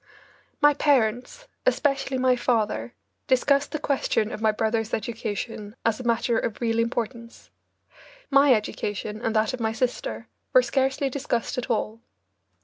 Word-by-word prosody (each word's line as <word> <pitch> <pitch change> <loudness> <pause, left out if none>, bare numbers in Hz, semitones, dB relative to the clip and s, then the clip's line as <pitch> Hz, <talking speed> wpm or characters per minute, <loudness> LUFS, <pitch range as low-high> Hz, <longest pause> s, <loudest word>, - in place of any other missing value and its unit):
My 295 0 +6
parents, 265 - +1 0.2
especially 275 - +1
my 255 0 +3
father, 240 -1 -1 0.3
discussed 280 +2 +2
the 305 - -1
question 270 -7 0
of - - -6
my 220 -1 +4
brothers' 220 +1 0
education 220 -1 -5
as 225 0 +1
a - - -6
matter 235 0 +1
of 225 - -3
real 230 -1 0
importance. 230 0 -3 0.8
My 275 0 +6
education 210 0 -4
and 225 -1 -1
that 215 +3 +2
of 255 - -4
my 220 -1 0
sister 255 - -2 0.3
were - - +7
scarcely 270 0 0
discussed 255 -2 -2
at 250 - -6
all. 225 0 -1
235 Hz, 140 wpm, -25 LUFS, 220-270 Hz, 0.8 s, were